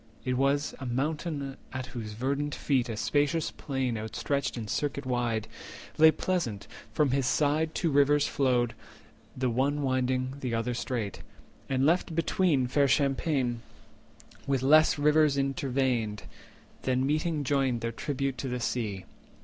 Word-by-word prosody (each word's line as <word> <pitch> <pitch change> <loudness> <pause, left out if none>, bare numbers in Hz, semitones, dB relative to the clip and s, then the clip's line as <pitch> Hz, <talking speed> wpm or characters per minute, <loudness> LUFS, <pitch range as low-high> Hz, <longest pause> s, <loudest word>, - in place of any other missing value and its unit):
It 125 -1 0
was 140 +3 +1
a 135 - -6
mountain 140 +2 -2
at 130 -1 -4
whose 110 -4 -5
verdant 140 +5 -2
feet 130 -4 0
A 110 - -4
spacious 145 +6 +1
plain 130 -5 -2
outstretched 130 +6 -2
in 110 -2 -5
circuit 140 +4 -2
wide 120 -3 -1 0.5
Lay 160 0 +9
pleasant; 160 - -1 0.3
from 150 -4 +2
his 135 -1 +1
side 155 +3 +1
two 165 -4 0
rivers 145 +1 +4
flowed, 125 -4 +1 0.6
The 130 -1 0
one 140 +4 0
winding, 130 0 0
the 125 -4 -2
other 115 +2 -1
straight, 115 -4 -3 0.5
and 135 0 +1
left 170 +1 +2
between 165 -4 +2
Fair 140 +3 +2
champaign, 135 -3 +1 0.9
with 135 -2 +1
less 155 +3 +5
rivers 150 -1 +4
interveined, 130 -5 0 0.6
Then 130 0 +1
meeting 155 +1 0
joined 135 -4 +1
their 115 0 -2
tribute 135 +1 -3
to 135 - -3
the 125 -1 -2
sea. 110 -6 -2
135 Hz, 140 wpm, -29 LUFS, 125-145 Hz, 0.9 s, Lay